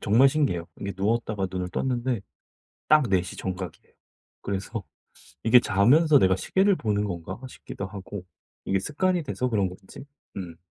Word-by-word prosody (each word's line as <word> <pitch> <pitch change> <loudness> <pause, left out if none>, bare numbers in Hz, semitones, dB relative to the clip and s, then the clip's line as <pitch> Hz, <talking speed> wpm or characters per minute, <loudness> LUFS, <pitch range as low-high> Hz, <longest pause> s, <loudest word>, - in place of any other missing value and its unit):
정말 115 +7 +5
신기해요. 135 - 0
이게 100 - -3
누웠다가 105 -1 0
눈을 90 -1 -3
떴는데 125 +1 -1 0.7
딱 155 -1 +6
4:00 90 -1 0
정각이에요. 90 -3 -6 0.5
그래서 100 +2 -4 0.6
이게 120 +2 +7
'자면서 135 - +5
내가 95 0 +4
시계를 190 - +2
보는 105 -5 0
건가?' 90 -1 -5
싶기도 100 -5 -7
하고 95 0 -8 0.4
이게 95 - +1
습관이 175 - 0
돼서 125 -3 -2
그런 100 -5 +1
건지 95 +7 -12 0.3
음. 85 -4 -6
100 Hz, 320 characters per minute, -26 LUFS, 95-130 Hz, 0.7 s, 이게